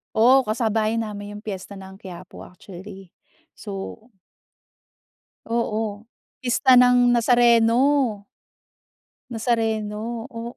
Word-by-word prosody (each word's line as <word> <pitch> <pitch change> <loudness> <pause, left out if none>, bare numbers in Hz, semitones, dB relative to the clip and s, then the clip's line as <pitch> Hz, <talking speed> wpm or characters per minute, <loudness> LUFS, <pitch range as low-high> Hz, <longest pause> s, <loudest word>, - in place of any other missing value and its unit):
Oh, 255 +4 +5
kasabayan 220 0 -1
namin 205 0 -8
yung - - -29
piyesta 195 -2 -7
ng 190 -1 -11
Quiapo 185 -2 -11
actually, 190 +1 -12 0.5
so 195 -2 -7 1.5
Oo, 225 -2 -3 0.3
pista 250 0 +4
ng 245 0 +5
Nazareno. 240 0 +3 1.1
Nazareno. 225 0 -2
O 235 -1 -8
225 Hz, 85 wpm, -22 LUFS, 205-240 Hz, 1.5 s, Oh